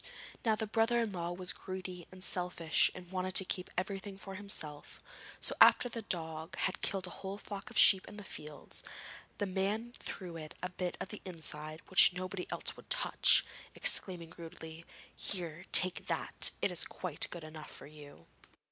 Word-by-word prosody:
Now 220 -2 +2
the 220 - -3
brother 225 +2 +1
in 230 -3 -1
law 175 -2 -4
was 180 0 -2
greedy 185 -2 -7
and 185 0 -4
selfish 180 -3 +2
and 180 -1 -11
wanted 185 0 -3
to 190 - +8
keep 180 0 -4
everything 195 +1 -4
for 195 0 -9
himself; 190 -7 0 0.4
so - - -4
after 245 - +7
the 230 -1 -5
dog 160 -3 -5
had 190 - -2
killed 195 -2 -1
a 180 - -8
whole 195 +1 -5
flock 200 0 -8
of 235 - -7
sheep 190 -2 +7
in 210 - -10
the 205 - -8
fields, 150 -5 -7 0.6
the 205 - -1
man 200 +5 -2
threw 175 -3 -6
it 155 -1 -9
a 180 - -2
bit 180 -1 -4
of - - -5
the 210 - -9
inside 155 -3 -5
which 185 -1 +7
nobody 185 +1 -5
else - - -3
would - - -16
touch, - - +4 0.3
exclaiming 180 - +4
rudely: 165 -1 -9 0.3
'Here, 170 -3 -3
take 185 -1 +6
that! - - +4
It - - +2
is 175 - 0
quite 175 -5 -1
good 175 -2 -8
enough 155 0 -10
for - - -9
you.' 145 - -14
185 Hz, 180 wpm, -33 LUFS, 165-195 Hz, 0.6 s, to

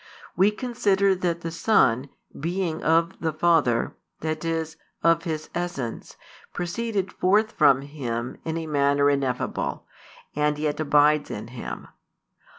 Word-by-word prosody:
We 190 +3 +5
consider 210 -4 +1
that 175 -2 -2
the 165 - -4
Son, 145 - +2 0.3
being 170 +1 -2
of 165 +3 +2
the 160 - -1
Father, 155 -7 +2 0.3
that 155 0 -3
is, 165 -1 -2 0.3
of 165 0 +3
His 155 -2 -4
essence, 170 -10 -4 0.4
proceeded 195 +2 -2
forth 210 +4 +2
from 135 - +4
Him 125 -5 -4
in 160 0 -3
a 165 - -4
manner 140 -1 +3
ineffable, 135 -3 -2 0.5
and 150 0 +1
yet 150 0 -2
abides 150 0 +3
in 110 +2 -6
Him. 125 -1 -7
160 Hz, 130 wpm, -25 LUFS, 145-175 Hz, 0.5 s, We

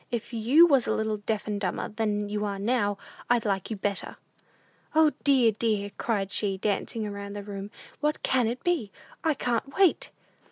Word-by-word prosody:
If 235 0 -4
you 245 +9 +6
was 275 -7 +3
a - - +1
little 220 -1 -1
deaf 210 +1 -2
and 205 -1 -3
dumber 185 -3 -2
than 210 -1 -1
you 210 0 -2
are 200 -1 -2
now, 205 -1 0 0.3
I'd 240 -2 +3
like 195 -2 -1
you 220 - -3
better! 200 0 -3 0.8
"O, 315 -1 +6
dear, 260 -5 +5
dear!" 210 -2 -1
cried 200 -4 -1
she, 200 -2 0
dancing 215 +2 -1
about 200 0 -6
the 205 - -5
room; 200 0 -6 0.3
"what 300 +1 -1
can 250 -3 +2
it 240 +3 -4
be? 320 - 0 0.3
I 315 -2 +2
can't 245 +2 -2
wait!" 385 -4 +4
215 Hz, 185 wpm, -27 LUFS, 205-245 Hz, 0.8 s, you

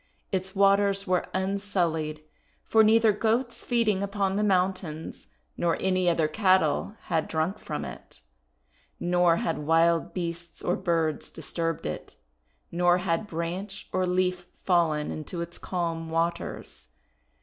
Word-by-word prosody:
Its 190 0 -2
waters 200 0 +3
were 180 -1 +1
un 190 +1 -1
sullied, 160 -6 -1 0.4
for 220 0 +5
neither 220 0 +5
Goats 230 +4 0
feeding 225 -5 +1
upon 200 -1 -1
the 210 - +1
moun 190 -2 +3
tains 160 - -8 0.3
nor 170 -1 +1
any 185 -1 +2
other 165 -2 +2
cattle 190 +4 +2
had 165 -3 -1
drunk 165 +6 -1
from - - -4
it, - - -10 0.8
nor 175 -1 +3
had 165 -1 -1
wild 165 +2 +3
beasts 170 -1 -5
or 175 - +1
birds 165 -4 0
disturbed 165 +1 -3
it, 75 -4 -5 0.6
nor 175 +1 +3
had 180 +2 -1
branch 180 +4 -5
or 185 0 +1
leaf 180 0 0 0.2
fallen 165 -5 +2
into 155 +3 -6
its 170 0 -6
calm 165 -3 -3
waters. 165 - -3
180 Hz, 135 wpm, -27 LUFS, 165-195 Hz, 0.8 s, for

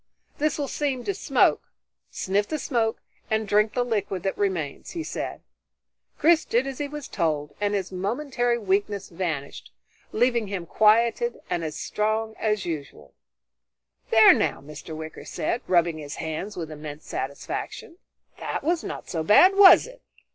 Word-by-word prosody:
"This 300 0 +1
will 285 -2 -2
seem 270 -3 -2
to 400 - -1
smoke. - - +2 0.5
Sniff 200 +2 -1
the 310 - -2
smoke 230 -6 -1 0.3
and 220 -1 0
drink 210 +1 +3
the 245 -1 +1
liquid 200 -6 -2
that 195 - -1
remains," 180 -8 -2
he 335 -2 -3
said. - - -5 0.8
Chris 325 +1 +4
did 240 +3 +1
as 270 -1 -6
he 290 - -2
was 295 -1 -7
told, 150 -4 -2
and 205 0 +1
his 190 -2 -3
momentary 240 +5 -1
weakness 200 -1 -1
vanished, 165 -6 -4 0.4
leaving 235 -1 +1
him 190 -3 -4
quieted 230 - +3
and 170 - -1
as 155 -1 -4
strong 220 +1 -1
as 210 -3 0
usual. 145 - -6 1.0
"There - - +8
now," - - 0
Mr. 150 +2 -9
Wicker 160 0 -8
said, 240 - -2
rubbing 170 -3 +2
his 145 -1 -7
hands 165 +6 -5
with 160 -3 -5
immense 150 0 -8
satisfaction, 140 - -5 0.4
"that - - -4
was 335 +1 0
not - - -6
so 165 - -2
bad, 350 - +6
was 395 -1 +8
it? - - -13
205 Hz, 155 wpm, -25 LUFS, 165-245 Hz, 1.0 s, There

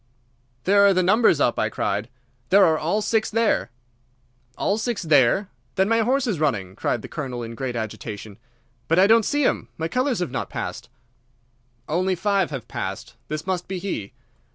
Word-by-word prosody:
"There 200 +1 +5
are 195 - +4
the 185 - +3
numbers 205 -4 +4
up," 120 - +2
I - - +1
cried. 105 +3 -2 0.4
"They 195 - +5
are 175 -6 +6
all 170 +8 0
six 220 0 +1
there." 225 0 +1 0.9
"All 205 +2 0
six 225 -3 -2
there? 155 - +3 0.3
Then 190 0 +2
my 230 +1 +3
horse 255 +4 +2
is 210 -10 -1
running," 105 -12 -1
cried 115 - -2
the - - -6
Colonel 130 -6 -5
in 115 0 -6
great 125 +1 -4
agitation. 110 -1 -6 0.5
"But 165 - +2
I 185 - +7
don't 225 +2 +6
see 290 0 +1
him. - - 0
My 160 - -2
colours 255 +5 0
have 180 -2 -2
not - - -3
passed." - - -5 1.0
"Only 185 +4 +1
five 200 0 +1
have 135 -6 -6
passed. - - -5
This 155 0 -4
must 185 -2 -2
be 190 - -4
he." 175 - -4
180 Hz, 180 wpm, -23 LUFS, 135-210 Hz, 1.0 s, I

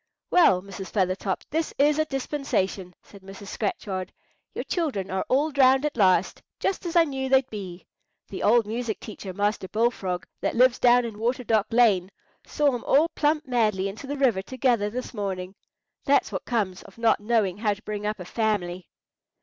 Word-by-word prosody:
"Well, 195 - +5
Mrs. 195 -1 -8
Feathertop, 190 -1 -1
this 320 +1 -2
is 295 +2 +3
a 310 - +2
dispensation!" 265 -10 -2
said 200 - -15
Mrs. 195 +1 -11
Scratchard. 190 -3 -3 0.4
"Your - - -3
children 260 - -2
are 190 0 -1
all 290 +4 +2
drowned 265 0 +4
at 300 - -2
last, 185 -5 +2 0.2
just 380 -2 -2
as 340 - -5
I 340 - +7
knew 265 -4 -3
they'd 265 -1 +4
be. 190 -4 -7 0.4
The 195 - -7
old 230 +1 +4
music 225 0 -3
teacher, 205 -3 -8
Master 205 0 -1
Bullfrog, 205 -5 -1
that - - -2
lives 250 +1 +4
down 245 0 +5
in 220 -3 -7
Water 245 +3 -1
Dock 220 -3 +1
Lane, 210 -6 +3 0.3
saw 290 -2 +1
'em 245 - -4
all 305 +5 +4
plump 300 0 0
madly 215 -6 +1
into 210 +7 -8
the 285 - -3
water 250 -9 +2
together 240 -2 0
this 250 +4 -6
morning. 190 -3 -4 0.5
That's 280 +1 +2
what - - -4
comes 205 -6 -1
of - - -16
not 230 -1 +3
knowing 210 -3 0
how 210 -2 +1
to 210 - -19
bring 210 0 -4
up 210 -1 -3
a 180 - -7
family!" 185 -4 -2
220 Hz, 180 wpm, -25 LUFS, 195-265 Hz, 0.5 s, I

